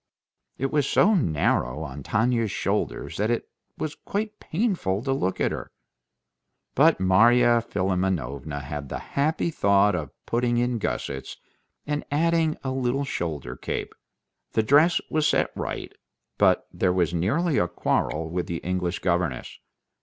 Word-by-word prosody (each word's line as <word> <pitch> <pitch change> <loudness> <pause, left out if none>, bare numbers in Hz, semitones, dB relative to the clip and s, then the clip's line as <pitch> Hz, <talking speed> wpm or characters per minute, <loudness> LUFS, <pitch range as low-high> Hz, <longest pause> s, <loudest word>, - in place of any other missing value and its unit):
It 135 0 -1
was 145 -2 +1
so 210 +3 +4
narrow 80 - +1
on 70 -1 -7
Tanya's 115 - +1
shoulders - - -2
that 105 +2 0
it 120 - -1 0.3
was 155 -1 -3
quite 210 +1 -4
painful 165 - -1
to 135 0 0
look 95 -8 -1
at - - +1
her. - - -5 1.0
But - - +4
Marya 120 +5 +5
Philimonovna 90 - -2
had 70 0 -6
the - - -3
happy 155 +4 -1
thought 100 -5 +3
of 75 -6 -3 0.2
putting 120 0 +1
in 120 -1 0
gussets, - - -4 0.5
and 150 0 -2
adding 160 +1 +2
a 130 - -2
little 130 +1 0
shoulder 75 - -4
cape. - - -4 0.6
The 110 - +2
dress 150 +9 +5
was 155 -1 +2
set - - +2
right, - - -5 0.5
but - - +4
there 90 - +1
was 90 -2 +1
nearly 135 - +1
a 90 - +2
quarrel 80 -1 -1
with 85 +2 -3
the 85 - -3
English 90 -1 -1
governess. 85 -8 -1
110 Hz, 145 wpm, -25 LUFS, 85-140 Hz, 1.0 s, Marya